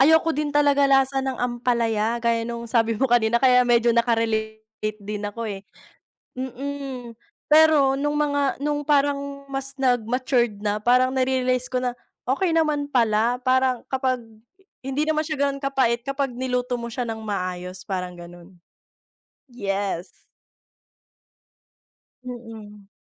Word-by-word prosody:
ayoko 320 +3 +5
din 300 +1 -1
talaga 285 -1 +3
lasa 270 0 +3
ng 265 -1 -3
ampalaya 235 -2 0
gaya 235 0 0
nung 235 0 -5
sabi 230 -1 +1
mo 265 - +1
kanina 235 -2 +3
kaya 250 0 +5
medyo 240 -1 +3
naka-relate 220 -2 -1
din 210 0 -4
ako 205 +3 -5
eh. 200 -3 -4 0.7
Mm, 260 -1 -6 0.3
pero 305 -3 +5
nung 295 +2 -1
mga 285 -2 +1
nung 290 +1 -1
parang 280 -1 0
mas 275 0 -6
nag 250 -3 +2
matured 245 -3 +1
na, 210 0 0
parang 255 +3 +3
na-realize 255 -1 0
ko 255 - -1
na, 250 -1 -1 0.3
okey 280 +9 +1
naman 300 -3 +1
pala, 230 -2 +2
parang 255 -1 +2
kapag 260 -1 0 0.6
hindi 270 +3 -1
naman 310 0 +1
siya 305 -3 -1
ganun 275 0 -2
kapait 260 -4 +1
kapag 275 0 -2
niluto 250 0 -2
mo 235 -1 -3
siya 245 +1 -3
ng 225 -1 -5
maayos, 185 -3 -4
parang 180 -3 -4
ganun. 175 +1 -13 0.9
Yes. 195 -5 -3 2.1
Mm. 220 -5 -10
250 Hz, 135 wpm, -23 LUFS, 225-275 Hz, 2.1 s, ayoko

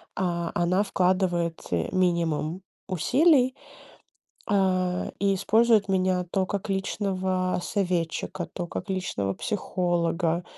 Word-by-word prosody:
А 170 -2 -1
она 180 +3 +2
вкладывает, 180 -3 0
э, 85 -2 0
минимум 170 -2 0 0.3
усилий, 260 - +3 0.9
а, 185 -3 +1
и 195 0 +2
использует 220 +2 +3
меня 185 -1 +1
то 190 -1 +1
как 200 +1 -4
личного 190 -2 -1
советчика, 175 -2 -2
то 175 -2 -4
как 195 - -6
личного 140 - -2
психолога, 175 - -1
185 Hz, 100 wpm, -26 LUFS, 175-195 Hz, 0.9 s, усилий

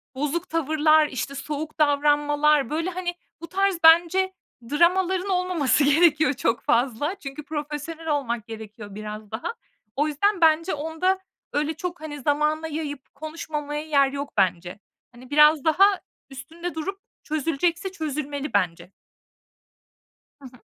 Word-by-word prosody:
bozuk 295 +5 -2
tavırlar, 310 -1 +3
işte, 275 +1 -4
soğuk 305 +3 -5
davranmalar, 295 0 +3
böyle, 325 +4 -1
hani, 355 -1 -4 0.3
bu 335 - -7
tarz 390 0 +1
bence 345 +4 +5 0.4
dramaların 365 +4 +2
olmaması 360 -6 +2
gerekiyor 300 +1 +4
çok 235 -3 -1
fazla. 255 - 0
Çünkü 275 +1 -7
profesyonel 305 +2 -6
olmak 240 -7 -1
gerekiyor 215 -2 -9
biraz 215 0 -8
daha. 230 - -4 0.4
O 295 +3 +1
yüzden 355 +6 +1
bence 325 +2 +4
onda 320 +6 -1 0.3
öyle 300 +2 0
çok, 355 -2 -6
hani, 295 -2 -7
zamana 300 +3 +1
yayıp 295 -3 -6
konuşmamaya 300 -1 -5
yer 280 -3 +3
yok 280 +1 -5
bence. 180 +1 0 0.3
Hani, 250 +1 -15
biraz 300 0 +5
daha 320 +5 +6 0.4
üstünde 325 +6 -7
durup 390 +5 -4 0.2
çözülecekse 330 +5 -1
çözülmeli 295 -4 -4
bence. 180 -2 -1 1.5
Hı - - -16
hı. 250 -1 -19
300 Hz, 125 wpm, -24 LUFS, 275-330 Hz, 1.5 s, daha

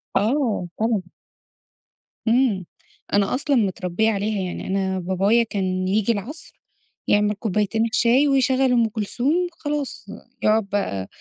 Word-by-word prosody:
آه، 220 -3 +1
طبعًا. 225 -2 +1 1.3
إمم. 225 -6 +2 0.5
أنا 200 +3 +2
أصلًا 285 0 0
متربيّة 200 0 +1
عليها. 205 0 -1
يعني 180 -1 -5
أنا 190 -1 -1
بابايا 195 +6 +2
كان 185 -3 -2
ييجي 210 +3 +2
العصر، 230 - -6 0.5
يعمل 210 0 +3
كوبايتين 215 +2 0
الشاي، 240 +5 +3
ويشغّل 265 -1 +3
أم 235 -2 +3
كلثوم 230 +6 -1 0.2
خلاص. 295 - -4 0.4
يقعد 215 -1 +2
بقى 100 - -2
215 Hz, 120 wpm, -22 LUFS, 195-245 Hz, 1.3 s, يعمل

